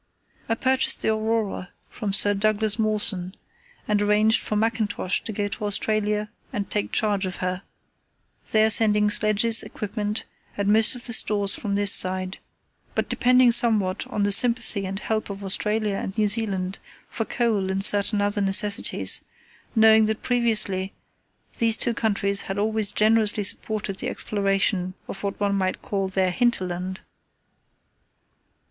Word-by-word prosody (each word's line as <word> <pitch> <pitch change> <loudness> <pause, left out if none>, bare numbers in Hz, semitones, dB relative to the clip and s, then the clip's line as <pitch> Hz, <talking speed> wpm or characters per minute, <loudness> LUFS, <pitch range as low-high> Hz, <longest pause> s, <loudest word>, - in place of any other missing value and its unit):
I 225 - +1
purchased 260 +2 +1
the - - +1
Aurora 220 -4 -2 0.2
from 210 -4 -5
Sir 205 +1 +2
Douglas 215 +1 0
Mawson, 205 -4 -1 0.5
and 210 -1 +1
arranged 210 +2 +3
for 215 - -4
Mackintosh 215 -3 -1
to - - -6
go 205 -1 -3
to 210 - -6
Australia 210 +1 0 0.2
and 205 -6 -4
take 210 - -2
charge 205 -3 0
of 185 - -6
her, 185 0 -4 0.9
there 220 0 +4
sending 210 -1 +3
sledges, 215 +2 +3
equipment 210 0 -4 0.3
and 200 0 -1
most 220 +3 +4
of 245 - -8
the 235 - -3
stores 205 -2 +3
from 200 -2 -4
this 200 -1 +4
side, 185 0 0 0.6
but - - -2
depending 250 0 +4
somewhat 220 -6 +2
on 205 - -3
the 205 - +1
sympathy 225 -2 +2
and 195 +1 -5
help 220 -1 -3
of 200 0 -8
Australia 210 +2 0
and 195 +2 -6
New 215 -1 +2
Zealand 195 -3 -2 0.3
for 225 - -4
coal 220 -5 -1
and 195 +1 +2
certain 205 0 +3
other 205 +1 -1
necessities, 200 +1 +2 0.5
knowing 220 -1 +5
that 220 0 -4
previously 215 -6 0 0.7
these 225 -1 +3
two 235 - 0
countries 200 -3 -1
had 195 - -6
always 215 0 +1
generously 215 -1 +2
supported 205 -1 -1
the - - -3
exploration 195 -2 -1
of 195 - -8
what 200 -1 -4
one 200 -1 0
might 190 -1 -2
call 195 -2 -2
their 190 -1 0
hinterland. 185 -5 -2
210 Hz, 150 wpm, -23 LUFS, 195-220 Hz, 0.9 s, knowing